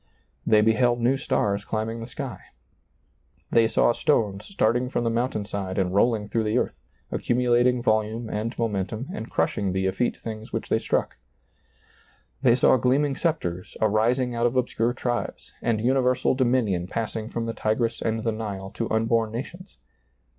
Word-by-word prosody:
They 110 -1 +6
beheld 120 +2 +3
new 120 +3 +3
stars 100 -6 0
climbing 110 +2 -3
the 115 - -6
sky; 130 -5 -6 1.1
they 115 -1 +5
saw 115 - +3
stones 105 -6 0
starting 125 - +1
from 120 - -1
the 115 - +1
mountain 115 -3 -1
side 95 -2 -4
and 95 -2 0
rolling 105 0 +2
through 110 +1 0
the 105 +3 +1
earth, - - -2 0.3
accumulating 120 0 +2
vol 110 -2 +3
ume 110 +2 -6
and 110 +2 -3
momentum 110 +2 -2
and 110 +2 -6
crushing 100 -3 0
the 95 0 0
eflete 110 +6 0
things 110 -1 -7
which - - -4
they - - +2
struck; - - -1 1.2
they 120 - +5
saw 130 +1 +5
gleaming 135 +3 +2
scepters 90 - -2
arising 115 +4 +2
out 120 0 +2
of 120 - -3
obscure 120 -2 +1
tribes, 120 -1 -3
and 115 -2 +1
universal 125 +1 +2
do 130 0 +1
minion 105 -8 +1
passing 110 +1 -3
from 115 -1 -3
the 115 - -3
Tigris 115 +2 -1
and 110 -1 -1
the 115 - +1
Nile 100 -3 -5
to 115 - -3
unborn 115 0 +1
nations; 175 - -7
they - - -42
115 Hz, 170 wpm, -25 LUFS, 110-125 Hz, 1.2 s, They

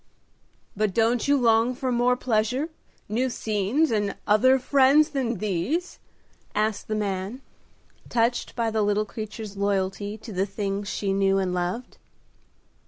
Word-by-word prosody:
"But 210 -2 0
don't 230 +2 +2
you 285 0 +4
long 230 0 +3
for 255 0 -2
more 245 +1 +2
pleasure, 250 +6 0 0.4
new 245 +5 0
scenes 225 +7 0
and 205 -3 0
other 255 +6 +5
friends 280 +3 +4
than 255 -6 -1
these?" 215 - -2 0.6
asked 215 0 0
the 215 - -1
man, 205 +4 -3 0.7
touched 235 +1 0
by 230 -1 0
the 220 0 0
little 205 +1 +1
creature's 215 -1 -7
loyalty 200 +1 -1
to 220 0 -10
the 190 +2 0
things 200 0 -3
she 200 -1 -1
knew 195 0 +2
and 185 -2 0
loved. 180 +7 -3
215 Hz, 140 wpm, -25 LUFS, 200-250 Hz, 0.7 s, other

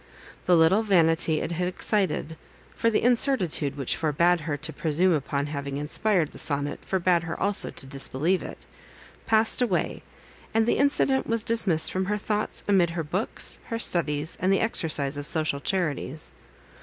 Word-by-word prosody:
The 180 -1 +5
little 165 +6 +4
vanity 165 -6 +3
it - - -4
had 180 +1 -1
excited 180 -4 -1 0.4
(for 230 - +1
the 220 - 0
incertitude 225 - +1
which 135 -3 -1
forbade 170 +3 +2
her 150 -3 -2
to 160 +2 -3
presume 170 +4 +2
upon 140 -1 -1
having 140 -2 -5
inspired 160 +3 0
the - - -11
sonnet, 145 -1 -1
forbade 180 -2 +1
her 165 0 -6
also 200 0 +1
to - - -7
disbelieve 140 +6 -1
it) - - -9 0.6
passed 220 +2 +3
away, 200 -8 -1 0.5
and 225 0 +3
the 240 - +1
incident 275 -1 +2
was 230 -1 0
dismissed 195 -9 +2
from 185 0 -1
her 210 +2 -1
thoughts 210 0 -3
amid 190 -4 +3
her 165 -1 -3
books, 185 +8 -3
her 230 - -3
studies, 155 -7 -1
and 185 - +1
the 195 - +3
exercise 155 -10 0
of 145 0 -2
social 155 -3 +1
charities. 155 -4 -2
170 Hz, 165 wpm, -26 LUFS, 150-205 Hz, 0.6 s, The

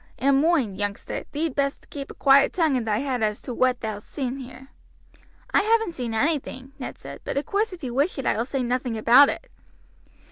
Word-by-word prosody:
And 275 0 +3
moind, 280 - +1
youngster, 205 0 -3
thee'd 310 0 -1
best 280 0 -2
keep 275 -2 -6
a - - -10
quiet 275 0 +5
tongue 320 -6 +2
in 245 -3 -1
thy 210 -2 +1
head 255 -4 -1
as 210 -1 0
to 250 - -5
whaat 255 +1 +1
thou'st 215 -2 -5
seen 265 -2 -3
here." 265 0 -11 0.8
"I - - +5
haven't 445 -2 +2
seen 240 -6 -4
anything," 270 -1 -1
Ned - - -6
said; - - -10
"but - - -4
of 280 - 0
course 415 +2 0
if 350 -4 -10
you 245 -2 -4
wish 285 +8 +1
it 270 - -4
I - - +2
will 225 - 0
say 265 0 -2
nothing 245 -1 -1
about 250 +6 +7
it." - - -5
265 Hz, 215 wpm, -24 LUFS, 240-290 Hz, 0.8 s, about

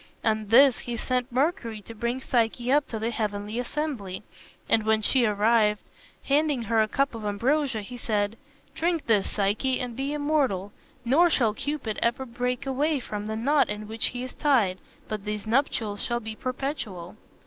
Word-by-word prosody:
On 215 -1 +1
this 255 +4 +6
he 240 -1 -4
sent 250 +2 -1
Mercury 255 - 0
to 230 - -10
bring 235 +3 -2
Psyche 240 0 0
up 290 +1 +3
to 225 - -4
the 225 +2 -2
heavenly 210 0 -3
assembly, 245 -8 -3 0.4
and 225 - +4
when 220 0 +2
she 245 +1 +4
arrived, 210 0 +3 0.4
handing 285 -3 +1
her 225 0 +2
a 215 - +2
cup 275 +5 0
of 225 -1 -7
ambrosia, 240 +4 0
he 245 +5 -8
said, 210 -2 -1 0.4
"Drink 335 -1 0
this, 210 -4 +2
Psyche, 215 +6 0
and 245 -2 -4
be 270 +3 -2
immortal; 290 -10 0 0.3
nor 320 +9 +5
shall 230 -9 +2
Cupid 260 -3 -3
ever 240 +3 +1
break 250 +1 -2
away 285 +3 +1
from 210 -4 -5
the 220 - -2
knot 275 +6 +2
in 210 0 -4
which 220 +1 -1
he 245 0 -5
is 255 - -7
tied, 230 -11 +2 0.3
but 215 -2 -4
these 210 0 -4
nuptials 220 -4 0
shall 240 0 -1
be 220 -1 -7
perpetual." 250 - -4
235 Hz, 175 wpm, -26 LUFS, 215-270 Hz, 0.4 s, this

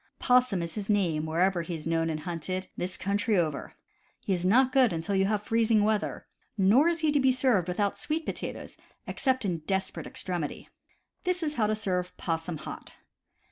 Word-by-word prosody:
Possum 250 -8 +3
is 170 - -5
his 210 -2 -4
name 170 -7 +1
wherever 175 +3 +2
he 170 0 -4
is 155 - -7
known 165 0 +1
and 155 -1 -3
hunted, 180 +2 -4
this 185 +1 -3
country 205 +2 0
over. 155 -5 -1 0.5
He 195 - -1
is 175 -1 -1
not 250 +8 +4
good 255 -4 +4
until 165 +5 -2
you 195 0 +3
have 210 0 0
freezing 225 -1 +3
weather; 215 0 0 0.3
nor 215 - +5
is 340 -1 +1
he 310 -2 +3
to 290 - +3
be 265 -1 +4
served 250 -8 +2
without 200 +3 -1
sweet 315 +1 -2
potatoes, - - -5 0.3
except 260 -4 0
in 175 -4 -1
desperate 190 -1 -2
extremity. 175 -5 -4 0.5
This 365 -2 0
is 300 -1 -1
how 220 -6 +1
to 215 - +1
serve 180 -4 -2
"possum 165 0 -3
hot." - - -8
195 Hz, 185 wpm, -28 LUFS, 175-235 Hz, 0.5 s, nor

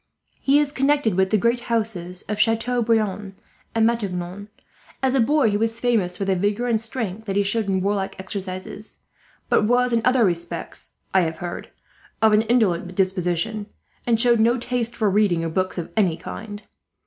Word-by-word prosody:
He 280 +1 +3
is 295 -1 +2
connected 280 -5 +2
with 190 +1 +2
the 215 - +3
great 235 +4 +1
houses 190 -6 -2
of 210 0 -4
Chateau 225 +3 +2
Briant 210 -4 0 0.4
and 225 -1 +4
Matignon. 200 -4 -2 0.6
As 260 -1 +2
a 270 - +3
boy 265 -1 +3
he 205 - +1
was 225 +1 -1
famous 220 -8 +1
for 200 - -2
the 195 -1 +1
vigour 205 +6 0
and 225 -2 +1
strength 225 -3 -4
that 195 - -2
he 205 - +3
showed 205 +1 0
in 190 -1 +1
warlike 195 0 -1
exercises; 190 +2 -6 0.4
but 210 - +3
was 245 +2 +2
in 230 - +3
other 250 -2 +4
respects, 170 -2 -4 0.2
I 190 - +5
have 160 -2 -2
heard, 175 +1 -6 0.5
of 220 -1 +4
an 210 - +5
indolent 200 -6 +1
disposition, 190 +3 0 0.4
and 230 -2 +3
showed 235 -1 +5
no 235 +3 +4
taste 240 -1 -2
for 220 - +1
reading 195 -4 +2
or - - -1
books 185 +4 -1
of 175 - -5
any 185 -7 +2
kind. 205 +4 -8
210 Hz, 185 wpm, -23 LUFS, 190-230 Hz, 0.6 s, I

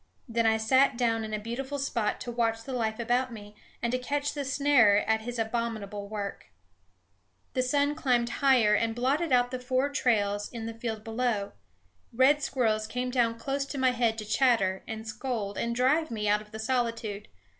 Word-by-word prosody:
Then 230 -1 +1
I 220 0 +3
sat 260 +4 +3
down 230 -2 +1
in 215 - -5
a 215 - -1
beautiful 250 +6 -4
spot 235 -6 -1
to 240 - -4
watch 225 -1 0
the 265 - -6
life 220 -3 -1
about 245 +2 0
me, 210 -2 -10 0.3
and 235 - +1
to 255 - 0
catch 285 +3 -2
the 290 - -3
snarer 265 -7 +4
at 220 0 +1
his 240 +2 -5
abominable 220 -3 -3
work. 200 - -5 1.1
The 255 - +1
sun 285 +3 +1
climbed 250 -6 +1
higher 250 -6 +5
and 225 +1 +1
blotted 280 +6 0
out 245 -1 +3
the 255 - -3
four 255 +2 0
trails 205 -7 0
in 230 -2 -6
the 230 - -4
field 225 -2 -5
below. 225 -3 -1 0.6
Red 265 +5 +4
squirrels 220 -6 0
came 250 +2 -3
down 235 -2 +1
close 275 +3 -2
to 280 - -6
my 260 -1 +3
head 235 -2 +1
to 215 - -5
chatter 210 -4 +2
and 220 0 -6
scold 220 -2 -3
and 235 0 -2
drive 295 +6 +2
me 210 -2 -3
out 210 +1 +3
of 210 - -15
the 220 - -8
solitude. 230 -3 -2
235 Hz, 190 wpm, -28 LUFS, 220-255 Hz, 1.1 s, higher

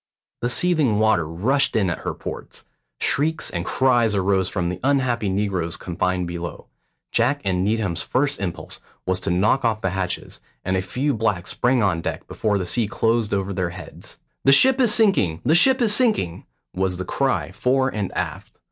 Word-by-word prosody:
The 120 - 0
seething 150 -7 +2
water 110 -7 +2
rushed 120 - +1
in 100 -5 +2
at - - -4
her - - -4
ports. - - -8 0.3
Shrieks 160 +3 0
and 85 - -3
cries 120 -5 +2
arose 95 -1 +1
from 90 -3 -2
the 90 0 -5
unhappy 130 -6 +1
negroes 95 -4 -1
confined 90 +1 -2
below. 85 0 -6 0.5
Jack 125 +5 +2
and 90 -1 +1
Needham's 105 -4 0
first 140 +2 0
impulse 90 -4 -5 0.3
was 95 0 0
to - - -4
knock 100 +10 +2
off 110 -2 0
the 95 - -1
hatches, 95 -1 -4 0.3
and 95 - 0
a 95 - +1
few 130 +10 -1
blacks 105 -6 -1
sprang 120 +4 +1
on 85 -4 +1
deck - - -5
before 105 -2 -1
the 95 - -2
sea 110 +5 0
closed 115 +1 0
over 100 0 -1
their 90 -2 -1
heads. 90 +2 -9 0.3
"The 135 - +5
ship 260 - +6
is 240 -4 +4
sinking, 190 - +2
the 150 - +4
ship 260 +10 +5
is 215 -3 +2
sinking," 210 - 0 0.3
was 95 -1 -1
the 95 - -4
cry 135 +7 -1
fore 130 +1 +1
and 105 -6 -3
aft. - - -5
105 Hz, 185 wpm, -22 LUFS, 90-130 Hz, 0.5 s, ship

